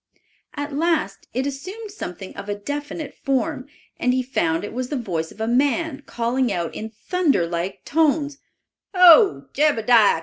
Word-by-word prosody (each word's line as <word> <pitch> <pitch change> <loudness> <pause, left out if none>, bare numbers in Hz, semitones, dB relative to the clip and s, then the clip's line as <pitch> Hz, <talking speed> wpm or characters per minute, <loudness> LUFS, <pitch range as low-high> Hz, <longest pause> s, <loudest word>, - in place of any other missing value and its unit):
At 290 0 -4
last 305 - 0
it 255 +2 -1
assumed 375 +11 -6
something 185 - -7
of 205 - -8
a 205 - -1
definite 290 +7 -5
form, 260 0 -2 0.3
and 250 0 +2
he 260 - +1
found 170 -10 0
it 205 - -6
was 250 +1 -3
the 295 - -2
voice 170 - -3
of - - -16
a 220 - -1
man 280 +4 +1
calling 240 +1 0
out 170 -3 -2
in 220 - -6
thunder 285 - 0
like 170 +3 -4
tones, 295 -2 +1 0.6
"Ho, 325 - +7
Jebediah! 235 - +4
255 Hz, 160 wpm, -22 LUFS, 205-295 Hz, 0.6 s, Ho